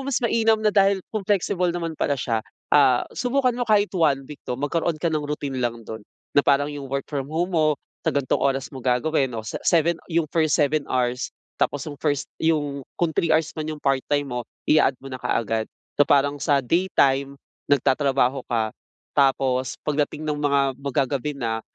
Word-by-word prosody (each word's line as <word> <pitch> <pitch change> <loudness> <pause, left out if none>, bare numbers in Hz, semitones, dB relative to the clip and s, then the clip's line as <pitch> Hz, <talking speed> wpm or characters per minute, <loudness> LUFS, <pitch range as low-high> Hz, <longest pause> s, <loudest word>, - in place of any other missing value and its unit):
mas 270 - 0
mainam 225 -1 +3
na 210 - +4
dahil 195 -2 +3
kung 215 - -1
flexible 190 -2 +1
naman 170 -1 -2
pala 145 - +1
siya, 115 -4 -1 0.3
ah, 135 -4 +5
subukan 255 +1 +1
mo 245 0 -3
kahit 210 -1 +3
1 150 -7 +2
week 145 +2 -11
'no, 125 - -1
magkaroon 160 +4 -1
ka 165 +1 -1
ng 155 - +1
routine 140 -3 -3
lang 120 -1 -2
do'n 110 +1 -7 0.3
na 145 - +5
parang 140 0 +3
'yung 140 -2 -7
work 140 0 -2
from 140 -2 -4
home 170 +4 -1
mo 155 -3 +3 0.2
sa - - -2
ganitong 140 -2 0
oras 135 0 0
mo 135 - -7
gagawin 130 +3 +1
'no, 115 -3 -6
sa 110 - -5
7 170 0 +2
'yung 170 -1 +1
first 155 -2 +2
7 150 -1 +1
hours, 125 0 0 0.3
tapos 145 - 0 0.2
first 145 -3 0 0.2
'yung 145 -3 0 0.2
kung 170 -2 0
3 165 - 0
hours 160 0 +2
man 155 -1 -5
'yung 155 -1 -6
part-time 140 +1 +1
mo 125 -4 -5 0.2
ia-add 150 -3 +4
mo 135 +1 -11
na 130 - -6
kaagad. 110 -2 -1 0.3
So 145 - +5
parang 145 0 +3
sa 140 -2 +2
day 175 +8 +1
time 140 +1 +3 0.3
nagtatrabaho 135 -1 +2
ka, 110 -2 0 0.4
tapos 130 -2 +2
pagdating 150 +1 -1
ng 150 -1 -2
mga 140 -1 +3 0.2
mag-gagabi 140 +1 -1
na, 115 -3 -2
145 Hz, 190 wpm, -23 LUFS, 135-160 Hz, 0.4 s, ah